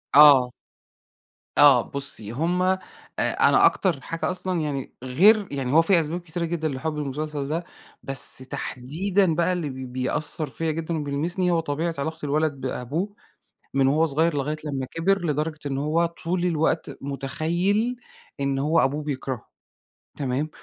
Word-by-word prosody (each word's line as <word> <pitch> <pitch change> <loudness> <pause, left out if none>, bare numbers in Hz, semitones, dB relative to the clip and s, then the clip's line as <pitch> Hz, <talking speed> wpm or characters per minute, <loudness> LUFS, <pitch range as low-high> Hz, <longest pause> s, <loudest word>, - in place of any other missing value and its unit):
آه. 140 -4 +8 1.1
آه. 140 -4 +8
بُصّي، 135 -6 -5
هم 165 +8 0
أ 185 +1 +3 0.4
أنا - - +4
أكتر 170 -8 +2
حاجة 165 +6 -3
أصلًا 185 -2 -2
يعني 140 -3 -4
غير 195 - +5
يعني 135 -3 -2
هو 165 - +7
في 175 +1 +4
أسباب 165 +2 -2
كتيرة 170 0 -4
جدًا 165 -1 -2
لحُبّي 150 +2 -3
المسلسل 145 0 -4
ده، 165 +3 -1 0.4
بس 135 -2 +2
تحديدًا 160 +8 -1
بقى 175 +2 +2
اللي 170 -5 -2
ب 130 -1 -7
بيأثّر 145 +4 -1
فيّا 160 +4 -2
جدًا 165 +1 -3
وبيلمسني، 160 +5 -1
هو 170 - +2
طبيعة 165 +2 -2
علاقة 160 +3 -3
الولد 155 +1 +1
بأبوه 140 - -3 0.6
من 135 -1 +3
وهو 155 +4 +3
صغير 160 +2 +1
لغاية 145 +2 -1
لمّا 135 -3 -3
كِبر. 175 +6 0
لدرجة 155 0 -1
إن 135 -1 -2
هو 155 +4 +1
طول 170 +1 -2
الوقت 160 -1 0
مُتخيّل 170 - -1 0.4
إن 140 -1 0
هو 155 +4 +2
أبوه 145 +3 +1
بيكرهه 135 -4 -4 0.7
تمام؟ 140 +2 -1
155 Hz, 150 wpm, -24 LUFS, 140-170 Hz, 1.1 s, آه